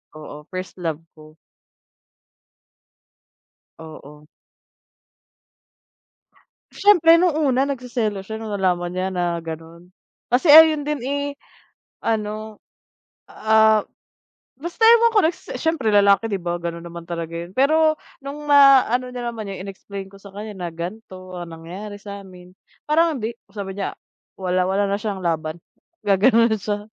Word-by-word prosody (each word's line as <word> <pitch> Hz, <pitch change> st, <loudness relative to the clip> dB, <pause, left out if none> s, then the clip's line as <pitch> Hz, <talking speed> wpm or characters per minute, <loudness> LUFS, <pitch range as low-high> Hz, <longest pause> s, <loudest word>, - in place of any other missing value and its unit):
oo, 150 Hz, -1 st, -11 dB
first 185 Hz, 0 st, -7 dB
love 165 Hz, -2 st, -3 dB, 0.2 s
ko. 155 Hz, +1 st, -16 dB, 2.4 s
Oo. 150 Hz, -2 st, -12 dB, 2.5 s
Siyempre 335 Hz, -5 st, +5 dB
nung 350 Hz, -4 st, +2 dB
una, 275 Hz, -3 st, +1 dB
nagseselos 240 Hz, -7 st, -3 dB
siya 220 Hz, +2 st, -6 dB
nung 220 Hz, -1 st, -6 dB
nalaman 180 Hz, -3 st, 0 dB
niya 185 Hz, +1 st, -2 dB
na 175 Hz, -2 st, -1 dB
ganun, 165 Hz, +2 st, -9 dB, 0.4 s
kasi 260 Hz, +7 st, +2 dB
ayun 310 Hz, -1 st, +8 dB
din, 300 Hz, -2 st, -2 dB
eh, 285 Hz, +2 st, -2 dB, 0.8 s
ano, 215 Hz, -1 st, -3 dB, 0.7 s
ah, 220 Hz, 0 st, +4 dB, 0.8 s
basta 345 Hz, +9 st, -4 dB
ewan 465 Hz, 0 st, +6 dB
ko -, -, +7 dB
nagse 325 Hz, +2 st, -2 dB
siyempre 320 Hz, -7 st, -1 dB
lalaki, 200 Hz, +1 st, +4 dB
di 200 Hz, -, -1 dB
ba 175 Hz, 0 st, -3 dB
ganun 170 Hz, 0 st, -5 dB
naman 170 Hz, 0 st, -9 dB
talaga 170 Hz, -1 st, -5 dB
yun. 170 Hz, +1 st, -6 dB
Pero 310 Hz, +3 st, +3 dB, 0.2 s
nung 295 Hz, +2 st, -7 dB
ma-ano 265 Hz, -3 st, +5 dB
niya 245 Hz, -1 st, -4 dB
naman 220 Hz, -3 st, -7 dB
yun, 190 Hz, -1 st, -7 dB
in-explain 195 Hz, 0 st, -8 dB
ko 195 Hz, -, -17 dB
sa 200 Hz, -, -13 dB
kanya 210 Hz, 0 st, -7 dB
na 180 Hz, -2 st, -5 dB
ganto 185 Hz, +1 st, -8 dB
ang 175 Hz, -1 st, -7 dB
nangyari 185 Hz, +6 st, -9 dB
sa'min, 190 Hz, -3 st, -11 dB, 0.3 s
parang 320 Hz, 0 st, +2 dB
hindi. 225 Hz, +1 st, -4 dB, 0.2 s
Sabi 195 Hz, -2 st, -6 dB
niya 200 Hz, -1 st, -4 dB, 0.4 s
wala, 185 Hz, -1 st, 0 dB
wala 195 Hz, +2 st, 0 dB
na 200 Hz, -, 0 dB
siyang 205 Hz, -2 st, -4 dB
laban, 165 Hz, -2 st, -2 dB, 0.5 s
gaganon 225 Hz, +4 st, +4 dB
na 220 Hz, -, +1 dB
siya. 205 Hz, +1 st, -3 dB
205 Hz, 135 wpm, -21 LUFS, 180-255 Hz, 2.5 s, ayun